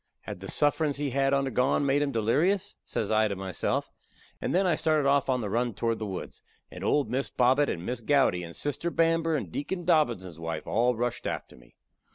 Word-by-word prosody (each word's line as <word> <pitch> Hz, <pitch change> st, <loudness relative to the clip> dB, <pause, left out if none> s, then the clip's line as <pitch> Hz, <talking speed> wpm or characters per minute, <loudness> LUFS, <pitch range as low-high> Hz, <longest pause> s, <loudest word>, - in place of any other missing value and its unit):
"Had -, -, -7 dB
the 95 Hz, -, -8 dB
sufferin's 145 Hz, -1 st, +1 dB
he 145 Hz, -2 st, -2 dB
had 135 Hz, +1 st, +2 dB
undergone 135 Hz, 0 st, +1 dB
made 140 Hz, +1 st, +2 dB
him 145 Hz, -1 st, 0 dB
delerious?" 145 Hz, -, +1 dB
says 105 Hz, -, -3 dB
I 110 Hz, 0 st, +4 dB
to 100 Hz, -, -3 dB
myself; 95 Hz, -2 st, -2 dB, 0.5 s
and -, -, -1 dB
then 190 Hz, +1 st, +3 dB
I 180 Hz, -, +3 dB
started 155 Hz, -3 st, +1 dB
off 140 Hz, -1 st, +2 dB
on 125 Hz, -1 st, +1 dB
the 105 Hz, -, -3 dB
run 120 Hz, -1 st, 0 dB
toward 115 Hz, +1 st, -1 dB
the 110 Hz, -, -3 dB
woods, 95 Hz, -2 st, -6 dB, 0.3 s
and -, -, -8 dB
old 140 Hz, -6 st, +1 dB
Miss 135 Hz, +2 st, -1 dB
Bobbet, 130 Hz, +4 st, +3 dB
and 85 Hz, +1 st, -4 dB
Miss 125 Hz, -1 st, -3 dB
Gowdy, 135 Hz, -8 st, +2 dB
and 85 Hz, -1 st, -8 dB
Sister 145 Hz, +4 st, -2 dB
Bamber, 165 Hz, -1 st, +2 dB
and 100 Hz, -, -3 dB
Deacon 175 Hz, -, -4 dB
Dobbinses' 120 Hz, -, +1 dB
wife 80 Hz, -1 st, -4 dB
all 120 Hz, +2 st, +2 dB
rushed 120 Hz, +1 st, -2 dB
after -, -, -5 dB
me. -, -, -20 dB
130 Hz, 205 wpm, -28 LUFS, 110-145 Hz, 0.5 s, I